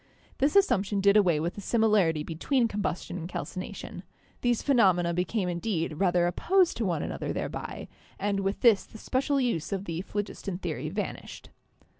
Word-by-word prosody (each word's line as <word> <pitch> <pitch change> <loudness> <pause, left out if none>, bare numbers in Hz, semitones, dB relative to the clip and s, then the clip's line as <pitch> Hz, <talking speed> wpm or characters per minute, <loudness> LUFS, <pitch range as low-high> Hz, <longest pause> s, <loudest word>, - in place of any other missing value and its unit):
This 280 +5 +2
as 400 -1 +7
sumption 200 +1 0
did 200 +1 +4
away 180 -7 +4
with 170 +3 -2
the 205 - -8
similarity 205 -9 +2
between 230 - 0
combustion 185 -4 -3
and 170 +1 -6
calcination; 185 0 -6 0.4
these 245 -2 +1
phenomena 185 - +3
became 180 +3 -1
indeed 170 -3 -2
rather 180 -2 +3
opposed 360 - +2
to 230 - -1
one 170 -4 -1
another - - -4
thereby, - - -5 0.3
and 200 0 -1
with 195 0 -2
this 230 -5 +5
the - - -13
special 275 +5 0
use 230 - -1
of 195 0 -2
the 165 -1 -3
phlogiston 200 -1 -4
theory 155 -5 -4
vanished. 205 +5 -6
195 Hz, 165 wpm, -28 LUFS, 175-220 Hz, 0.4 s, as